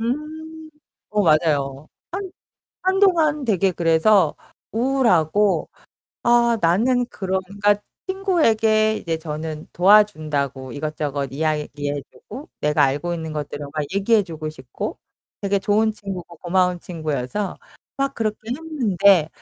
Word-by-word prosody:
음. 315 +5 -5 0.4
어 210 0 +2
맞아요. 155 -4 +1 0.2
한 380 +1 -4 0.5
한동안 355 -6 +3
되게 195 -5 +2
그래서 170 +2 +3 0.4
우울하고 210 - +2 0.5
아 235 -1 +4
나는 235 +9 +2
그런 190 -5 -2
그니까 205 +1 +2 0.3
친구에게 225 - +2
이제 165 -5 -3
저는 155 -1 -6
도와준다고 155 -10 +2
이것저것 145 -1 -3
이야기해 145 -1 -2
주고 295 +6 -11
내가 150 -1 +3
알고 145 +6 -1
있는 160 -2 -5
것들을 145 -1 -5
막 150 -1 -2
얘기해 205 +2 +3
주고 160 -4 -6
싶고 130 -5 -6 0.4
되게 200 0 +1
좋은 215 +2 +2
친구고 185 -5 -7
고마운 180 0 +1
친구여서 155 +3 -3 0.4
막 275 0 -1
그렇게 215 -2 -1
했는데 210 - +2
190 Hz, 270 characters per minute, -22 LUFS, 155-230 Hz, 0.5 s, 아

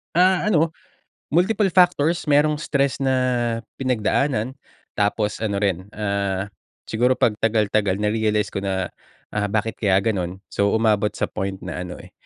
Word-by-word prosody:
Ah, 185 +2 +4
ano, 165 -5 +3 0.6
multiple 195 +4 +3
factors, 175 -3 +3
merong 150 +1 +3
stress 140 -3 0
na 130 -1 +2 0.6
pinagdaanan, 130 0 0 0.4
tapos 105 +1 0
ano 100 -3 -1
rin, 95 -1 -1
ah, 100 -2 -1 0.4
siguro 125 +3 +1
'pag 115 - +3
tagal, 110 -1 +2
tagal 100 -3 +1
na-realize 105 0 0
ko 100 - -2
na, 95 -2 -2 0.4
ah, 105 -1 0
"Bakit 110 +1 -1
kaya 100 -3 +3
gano'n?" 95 -4 -1
So, 100 0 +1
umabot 105 -2 +2
sa - - 0
point 95 0 -3
na 90 - -4
ano, 90 -1 -7
eh, - - -15
110 Hz, 145 wpm, -22 LUFS, 100-140 Hz, 0.6 s, Ah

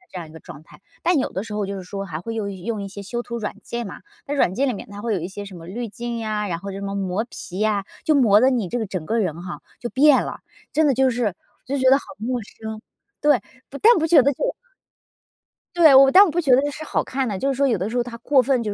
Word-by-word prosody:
的 365 - -27
这 185 - -5
样 165 -3 -8
一 - - -15
个 160 - -10
状 150 - -12
态。 160 - -18 0.2
但 350 -2 +3
有 265 - -1
的 190 - -3
时 220 0 -8
候 210 -1 -1
就 200 0 -4
是 190 - -6
说 195 +2 -6
还 160 -5 -6
会 225 +6 -5
用 210 -3 -3
用 200 +3 -4
一 200 - -5
些 200 +1 -8
修 240 +5 -4
图 235 -1 -5
软 210 -2 -4
件 235 -1 -4
嘛， - - -9 0.3
在 290 - -2
软 190 -10 +2
件 275 +6 +1
里 - - 0
面 - - -9
它 205 0 -8
会 230 -1 0
有 185 - -1
一 170 - -4
些 205 +1 -7
什 195 -2 -10
么 165 -1 -11
滤 230 +6 -5
镜 235 +2 -5
呀， 215 -2 -2
然 170 -2 -2
后 195 +3 -7
什 195 0 -6
么 200 0 -4
磨 195 +2 -1
皮 185 -2 -8
呀， 210 -2 +1 0.2
就 310 - +3
磨 220 -7 +5
得 260 +2 +5
你 235 -8 0
这 245 - -2
个 220 - -2
整 185 -4 -5
个 230 - 0
人 175 -5 -2
哈， 180 -1 -7 0.2
就 240 - -3
变 285 +1 +5
了， - - -6 0.3
真 315 0 +3
的 285 - +4
就 265 +1 +3
是 230 -6 -1 0.3
就 275 +2 -2
觉 260 0 +3
得 270 - +7
好 285 - -5
陌 245 +3 -2
生 220 +1 -8 0.4
对， 295 -4 +4 0.3
不 280 - -7
但 460 +8 +7
不 320 - +1
觉 315 -4 +6
得 280 +3 +3
就 280 - -3 1.3
对， 320 -5 +7
我 270 0 +8
但 385 +6 +9
我 405 - +2
不 330 +3 -1
觉 300 -6 +1
得 280 +3 +1
是 300 +2 -7
好 - - -1
看 265 0 -2
的， 200 -4 -3
就 275 - -1
是 - - -2
说 280 0 +3
有 225 -7 +1
的 190 +4 -2
时 240 - -3
候 240 - +2
它 240 -1 -8
过 270 0 +3
分 260 -1 +1
就 210 -3 -2
230 Hz, 320 characters per minute, -22 LUFS, 195-270 Hz, 1.3 s, 但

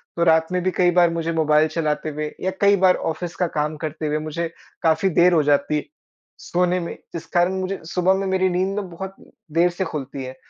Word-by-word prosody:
तो 170 - +1
रात 160 0 +3
में 180 0 0
भी 185 - +1
कई 180 -1 +4
बार 175 -1 +4
मुझे 165 0 -2
मोबाइल 155 -1 +3
चलाते 155 -1 -2
हुए 150 0 -4
या 190 - 0
कई 200 0 +6
बार 185 -1 +5 0.2
ऑफिस 175 +2 -6
का 180 - 0
काम 150 +1 0
करते 155 0 -4
हुए 150 0 0
मुझे 155 +2 -3 0.4
काफ़ी 160 +4 +3
देर 180 +1 +6
हो 160 -3 +4
जाती 145 +1 +1 0.6
सोने 180 +1 0
में 170 - -5 0.2
जिस 165 - -6
कारण 175 +2 +3
मुझे 190 +1 -3
सुबह 180 +3 +2
में 195 +1 -1
मेरी 190 0 +2
नींद 185 +2 0
में 195 -3 -6
बहुत 190 +3 -7 0.4
देर 170 +3 +3
से 180 +2 -3
खुलती 140 -4 -5
है। 130 0 -7
170 Hz, 215 wpm, -22 LUFS, 155-180 Hz, 0.6 s, कई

